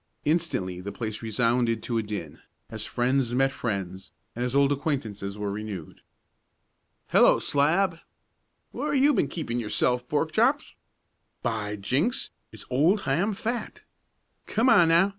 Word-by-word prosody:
Instantly 145 - 0
the 100 +2 -5
place 110 -2 -5
resounded 115 0 +1
to 115 -2 -1
a - - +1
din, 100 -8 -6 0.3
as - - -4
friends 125 0 0
met 135 +1 +3
friends, 95 -7 -4 0.2
and 120 - -2
as 125 +1 -2
old 140 0 +4
acquaintances 115 -9 -3
were 105 -1 -3
renewed. 100 -6 -7 1.1
"Hello, - - +6
Slab!" 165 +5 +1 0.7
"Where - - -2
have 265 - +3
you 290 +1 +5
been 190 - +2
keeping 120 -8 -3
yourself, 125 +2 0
Pork 155 +2 0
Chops!" 260 - +1 0.7
"By 105 -2 -2
jinks! 135 - 0 0.2
There's - - -11
old 165 +11 +3
Ham 175 +10 0
Fat!" 230 +4 -4 0.6
"Come 230 +4 +2
on, 170 -7 +6
now! 170 +4 +4
125 Hz, 140 wpm, -26 LUFS, 105-165 Hz, 1.1 s, Hello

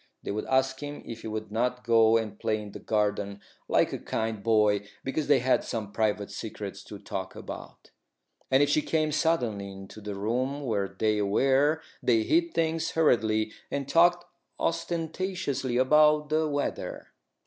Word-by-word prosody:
They - - -3
would 105 +1 -3
ask 130 0 +2
him 145 0 -7
if 115 -1 -7
he - - -6
would 110 -1 -5
not 125 +3 -1
go 115 0 +5
and 110 -2 -4
play 110 0 0
in 105 -1 -8
the - - -8
garden, 105 -2 -1 0.3
like - - +2
a - - -3
kind 110 -2 -3
boy, 105 -2 +2 0.2
because 140 +3 -2
they 145 -1 +6
had 130 +1 +2
some 110 -4 -4
private 105 -2 0
secrets 100 -1 -6
to - - -8
talk - - -6
about; - - -9 0.6
and 135 +2 +5
if 145 0 +2
he 155 - +3
came 155 0 0
suddenly 120 -11 0
into 95 +2 -11
the 105 -1 -5
room 125 +8 -1
where 100 -5 0
they 105 +2 0
were 135 +9 +2 0.2
they 115 -3 +3
hid 335 - +1
things 165 0 0
hurriedly 110 -8 +2 0.2
and 140 -1 -3
talked 175 +3 +4 0.3
ostentatiously 165 -5 -2
about 150 +3 +4
the 155 +1 +2
weather. 145 0 -3
120 Hz, 165 wpm, -28 LUFS, 105-150 Hz, 0.6 s, they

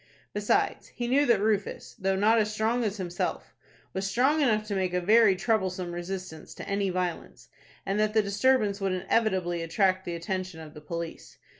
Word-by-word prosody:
Besides, 390 - 0
he 240 -2 -5
knew 280 +4 +3
that 235 -4 +4
Rufus, 210 -1 -1
though 195 0 -1
not 215 +4 +4
as 215 -1 +1
strong 225 +3 0
as 210 -1 -2
himself, 175 -2 -3 0.4
was 195 +1 -2
strong 270 +8 +2
enough 215 -6 +2
to 210 - -4
make 185 -2 -1
a - - +2
very 210 +2 +5
troublesome 185 -3 -1
resistance 175 -2 -6
to - - -8
any 200 0 0
violence, 180 -2 -4 0.4
and 195 +2 -1
that 215 0 +1
the 220 - +5
disturbance 205 0 +2
would 195 -1 0
inevitably 185 -3 0
attract 185 +3 +1
the 175 - -3
attention 185 0 -4
of 155 -1 -10
the 150 - -11
police. 170 +2 -7
195 Hz, 180 wpm, -28 LUFS, 180-220 Hz, 0.4 s, very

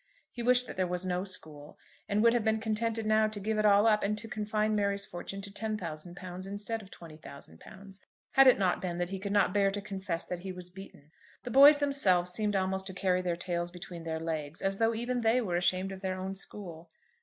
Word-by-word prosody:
He 240 - -6
wished 250 +1 +5
that - - -9
there 185 -1 +1
was 180 +1 -3
no 180 0 -1
school, 155 -6 -4 0.3
and 210 +2 +2
would 230 0 +6
have 240 -2 +1
been 220 0 +1
contented 225 0 -1
now 215 0 +3
to 215 -1 -5
give 215 +2 -1
it 215 - +4
all 205 +1 +5
up, 215 -2 +4
and 210 +1 -1
to 220 +2 -5
confine 215 0 -1
Mary's 200 -1 0
fortune 195 +3 -7
to 200 - -7
£10,000 185 -3 -5
instead 205 +3 -4
of 195 - -14
£20,000, 165 - -12 0.3
had 270 0 +6
it 255 - +7
not 185 -2 +1
been 175 -2 -3
that 175 0 -2
he 195 0 -4
could 200 +1 -4
not 205 -2 +3
bear 200 -1 +3
to 200 +1 -3
confess 190 -4 -4
that 180 - -5
he 190 +1 -6
was 180 -1 -9
beaten. 180 -6 -13 0.3
The 245 - -6
boys 285 +3 +9
themselves 195 -12 +2
seemed 210 +1 0
almost 190 0 -1
to 190 - -5
carry 185 -1 +1
their 175 -2 -1
tails 175 0 -2
between 175 -1 -9
their 160 -1 -4
legs, 160 -2 -4
as 195 0 -1
though 225 0 +2
even 245 +2 -2
they 230 +2 +3
were 190 -8 -2
ashamed 185 +2 +1
of 190 -1 -8
their 185 -1 -3
own 190 +1 -4
school. 175 -4 -8
195 Hz, 225 wpm, -30 LUFS, 180-215 Hz, 0.3 s, boys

